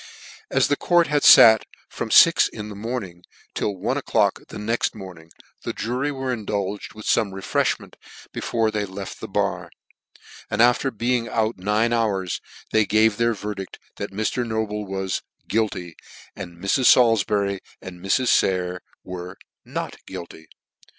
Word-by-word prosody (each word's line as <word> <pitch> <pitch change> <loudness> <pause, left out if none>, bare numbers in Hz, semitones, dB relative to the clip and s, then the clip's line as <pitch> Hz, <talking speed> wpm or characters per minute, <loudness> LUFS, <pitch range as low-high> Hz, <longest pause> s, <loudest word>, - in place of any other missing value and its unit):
As - - +2
the 145 - +2
court 175 +3 +3
had 150 -2 +1
fat 110 -5 +8 0.2
from - - -5
fix - - +6
o'clock - - -12
in 105 0 -5
the 105 - -8
morning, 100 -5 -5 0.3
till 105 - -2
one - - -1
o'clock - - +1
the - - -9
next 110 +3 -1
morning, 90 -5 -11 0.3
the - - -4
jury 125 +6 -2
were 130 -2 -3
indulged 105 -2 -4
with 110 - -10
fome 105 -3 +2
refrefhment 95 0 -1 0.4
before 115 -2 0
they 105 -1 -1
left 95 0 -8
the - - -6
bar, - - -2 0.8
and 105 - -3
after 120 +3 +4
being 120 0 -1
out 110 -2 -1
nine 105 +5 +1
hours, 100 -6 -1 0.3
they 110 - +4
gave 110 0 +3
their 115 -1 +1
verdict 105 -2 -6 0.2
that 100 - -4
Mr. 110 +5 -2
Noble 110 -2 -3
was 95 -1 -3
" - - -44
Guilty," 100 -6 -2 0.4
and 85 -3 -8
Mrs. 100 +8 +1
Salifbury 105 -4 +3 0.2
and 90 -1 -10
Mrs. 95 +7 +1
Sayer 90 -1 +1 0.2
were 90 +1 -8 0.2
" - - -68
Not - - -4
guilty." 80 -2 -9
105 Hz, 155 wpm, -23 LUFS, 95-115 Hz, 0.8 s, fat